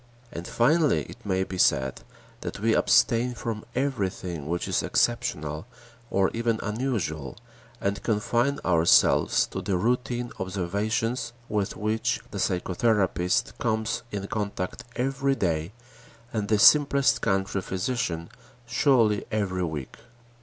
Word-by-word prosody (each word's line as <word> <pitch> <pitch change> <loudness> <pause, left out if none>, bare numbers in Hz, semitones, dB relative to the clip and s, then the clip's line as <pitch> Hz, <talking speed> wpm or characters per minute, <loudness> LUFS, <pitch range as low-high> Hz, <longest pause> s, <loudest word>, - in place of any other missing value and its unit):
And 85 +1 -6
finally 150 +5 +3
it 120 - -13
may 95 -2 0
be 95 -1 -6
said 65 -5 +2 0.4
that - - -6
we - - +2
abstain 120 +2 +3
from 110 -2 -4
everything 95 - -2
which 85 +2 -2
is - - +1
exceptional 80 -8 -1 0.4
or 95 -1 +2
even 115 -1 0
unusual, 105 - -2 0.4
and 100 +1 -1
confine 120 +5 +1
ourselves 85 -2 +4
to - - -6
the 95 - 0
routine 120 +3 -1
observations 105 +6 -2
with 105 -2 -2
which 110 +3 0
the 100 - -5
psychotherapist 95 0 +1
comes 110 -4 -1
in 100 -1 -4
contact 100 +2 -4
every 135 +2 0
day 85 -6 -1 0.6
and 105 -2 -1
the 110 - +3
simplest 140 +3 +5
country 95 0 0
physician 95 -4 -2 0.4
surely 120 -4 +3
every 95 -4 -1
week. 75 -5 -6
105 Hz, 120 wpm, -26 LUFS, 90-120 Hz, 0.6 s, simplest